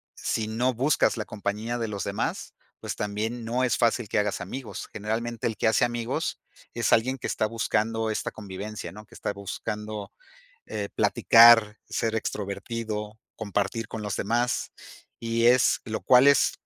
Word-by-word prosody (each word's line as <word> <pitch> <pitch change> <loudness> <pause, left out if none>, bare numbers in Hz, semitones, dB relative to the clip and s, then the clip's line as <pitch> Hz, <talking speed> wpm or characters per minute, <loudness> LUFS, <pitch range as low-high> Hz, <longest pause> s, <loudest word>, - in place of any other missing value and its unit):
si 110 -1 -2
no 125 +4 +1
buscas 135 +6 +2
la 110 - -2
compañía 105 +3 -3
de 115 -1 -2
los 100 -2 -4
demás, 100 - -3 0.3
pues, - - -4
también 110 +3 -3
no 120 +3 0
es 125 -3 +2
fácil 115 -2 +1
que - - 0
hagas 105 -1 -1
amigos. 115 +6 -6
Generalmente, 110 +2 -3
el 110 - -3
que 100 - 0
hace - - +3
amigos 120 -1 -2 0.3
es - - 0
alguien 130 +4 +2
que - - -4
está - - 0
buscando 110 0 -1
esta 110 - -2
convivencia, 100 -2 -7
¿no?, 105 +3 -11
que - - -18
está - - -3
buscando, 105 +2 -5 0.6
eh, 100 -1 -4
platicar, 115 -2 +6
ser 115 -1 -1
extrovertido, 105 0 -4 0.2
compartir 105 +1 -2
con 110 - -6
los 105 -2 -3
demás, 120 +4 0 0.5
y 115 0 +1
es 125 +1 +5
lo 110 -2 -4
cual 125 +2 +6
es 140 -2 +4
110 Hz, 160 wpm, -26 LUFS, 105-120 Hz, 0.6 s, platicar